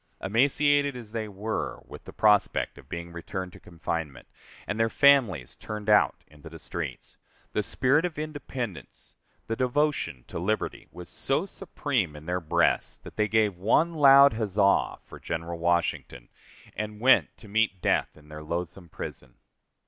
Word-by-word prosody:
Emaciated 140 +6 +2
as 115 -4 -9
they 110 -1 -3
were, 105 +2 -4
with - - -12
the - - -9
prospect 105 -2 +2
of - - -17
being 85 0 -6
returned 90 +2 -6
to - - -13
confinement, 80 -3 -5 0.4
and 105 - -3
their 115 0 +3
families 120 - +3
turned 105 0 -4
out 105 - +3
into 75 +2 -14
the 80 - -10
streets, - - -7 0.4
the - - +1
spirit 135 +5 +2
of 175 -4 -3
independence, 135 - -6 0.3
the 115 - -2
devotion 130 - -1
to - - -6
liberty, 110 +5 -2
was 90 0 -10
so 135 +7 -1
supreme 135 - -2
in 75 +1 -11
their 90 +1 -2
breasts, 80 - +1
that - - -13
they 105 0 +1
gave 105 -4 +2
one 155 - +2
loud 140 -3 +7
huzza 100 -2 +1
for - - -12
General 85 +1 -5
Washington, 85 -7 -1 0.5
and 105 0 -5
went 130 +3 +5
to 110 - -14
meet 105 -2 +1
death - - 0
in 75 -1 -18
their 75 0 -9
loathsome 85 +3 -5
prison. 65 -4 -8
105 Hz, 155 wpm, -27 LUFS, 85-130 Hz, 0.5 s, loud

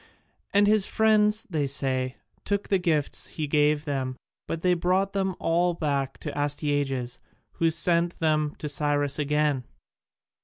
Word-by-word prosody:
And 200 +1 +4
his 210 -1 +3
friends, 215 -1 +3
they 155 -6 -1
say, 130 -1 -1 0.3
took 200 0 -2
the 195 - +3
gifts 160 -5 0
he 155 - -4
gave 150 +1 +2
them, 130 -3 -3 0.3
but 165 - -4
they 180 0 +3
brought 185 +3 +1
them 190 -2 -1
all 175 +1 +1
back 140 -4 -2
to - - -5
Astyages, 145 -4 -1 0.4
who 165 - +3
sent 170 +1 +1
them 155 -2 +1
to 150 - -5
Cyrus 145 0 0
again. 150 -2 +1
150 Hz, 145 wpm, -26 LUFS, 145-180 Hz, 0.4 s, And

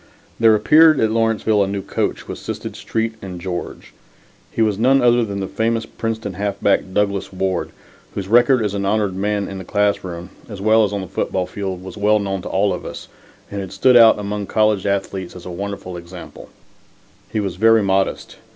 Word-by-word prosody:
There 115 -1 +6
appeared 155 +6 +5
at 110 -1 +2
Lawrenceville 110 -2 +2
a - - -1
new 100 0 -3
coach - - -2
who - - -7
assisted - - -6
Street 115 0 -2
and 90 -2 -7
George. 90 0 -6 0.6
He 115 - 0
was 105 -2 0
none 130 +4 +4
other 120 -1 +4
than 100 -2 -4
the 95 - -3
famous 115 +1 -1
Princeton 110 -3 -4
halfback, 100 0 0
Douglas 100 0 -1
Ward, 95 -1 -2 0.5
whose 95 -2 -4
record 120 +2 +4
as 100 - -2
an 100 -1 -2
honored 100 -1 0
man 100 +1 -1
in 95 -1 -6
the - - -7
classroom 95 -3 -1 0.2
as 100 -3 -8
well 110 +2 +4
as 105 - 0
on 100 -1 -2
the 95 - -7
football 95 0 -2
field 95 -1 -5
was 95 +1 -9
well 105 +1 +3
known 95 -2 -2
to - - -7
all 100 +1 +1
of - - -6
us, - - -8 0.4
and 100 -1 -3
had 95 -2 -7
stood 125 +6 +3
out 115 -2 +8
among 105 -1 -4
college 105 -2 +1
athletes 95 -2 -2
as 90 - -11
a 90 - -6
wonderful 100 0 -6
example. 85 +1 -10 0.8
He 110 - -1
was 95 -4 -3
very 115 +1 +5
modest. 95 0 -1
100 Hz, 195 wpm, -20 LUFS, 95-110 Hz, 0.8 s, out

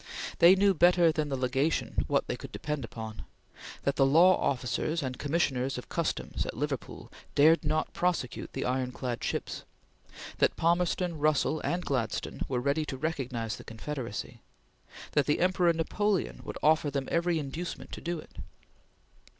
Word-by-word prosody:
They 175 +3 +8
knew 195 0 +4
better 175 -1 +5
than 155 -2 -2
the 135 - -1
Legation 135 +5 0
what - - +1
they - - -3
could - - -9
depend 150 -2 -3
upon: 110 -1 -7 0.6
that 140 - 0
the 135 - +5
law 175 +6 +6
officers 140 +5 -1
and 130 0 -4
commissioners 140 -4 0
of 125 - -8
customs - - -2
at - - -6
Liverpool 140 -2 -4 0.2
dared 160 +4 +6
not 155 +1 0
prosecute 175 -9 -1
the - - -3
ironclad 125 -1 -2
ships; - - -3 0.8
that - - +3
Palmerston, 175 0 +1
Russell, 155 +1 +2
and 175 +1 -2
Gladstone 120 -6 -2
were 125 -2 0
ready 140 +5 +1
to 135 - -5
recognize 130 -7 -3
the - - -11
Confederacy; 115 -1 -6 0.7
that 145 - +2
the 150 - +2
Emperor 180 -1 +3
Napoleon 190 +4 -1
would - - -6
offer 155 -1 +4
them 140 -1 -2
every 170 0 +2
inducement 155 +4 -5
to - - -7
do 170 0 -2
it. 155 - -12
150 Hz, 155 wpm, -29 LUFS, 130-170 Hz, 0.8 s, They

